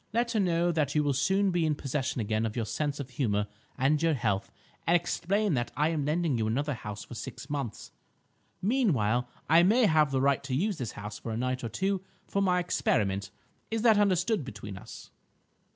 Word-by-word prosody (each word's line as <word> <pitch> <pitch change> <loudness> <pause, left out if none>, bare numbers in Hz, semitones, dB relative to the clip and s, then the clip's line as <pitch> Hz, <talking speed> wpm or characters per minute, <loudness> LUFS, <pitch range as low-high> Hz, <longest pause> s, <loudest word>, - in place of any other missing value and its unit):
"Let 235 +1 +1
her 220 - +1
know 175 -2 +2
that 150 -3 0
you 150 - +3
will 145 -1 +1
soon 190 +8 +2
be 175 -1 +1
in 155 -1 +1
possession 135 -2 -2
again 110 +1 0
of 110 -1 -2
your 115 -3 -1
sense 145 +5 -2
of 135 -2 -6
humour 105 -6 0 0.3
and 140 +3 +2
your 165 -2 +3
health, 105 -6 -1 0.4
and 170 - +5
explain 190 +3 +1
that 120 -3 -1
I 150 +2 +3
am 155 -4 -1
lending 155 -4 +1
you 110 - +1
another 140 +6 0
house 105 -3 -6
for - - -10
six 135 +4 -7
months. 135 -7 -4 0.7
Meanwhile 130 - +2 0.2
I 165 +2 +6
may 220 +7 +5
have 155 -5 +4
the 135 -1 0
right 140 0 +2
to 130 - -1
use 195 +5 0
this 120 -5 -4
house 105 0 -7
for 115 - -5
a 110 - -2
night 125 +1 -1
or 115 - -2
two 195 - -1 0.3
for 200 - 0
my 180 -2 +3
experiment. 100 - 0 0.4
Is 225 0 -1
that 220 -3 +6
understood 200 -1 +2
between 105 -5 -8
us?" 95 - -11
145 Hz, 205 wpm, -29 LUFS, 120-180 Hz, 0.7 s, I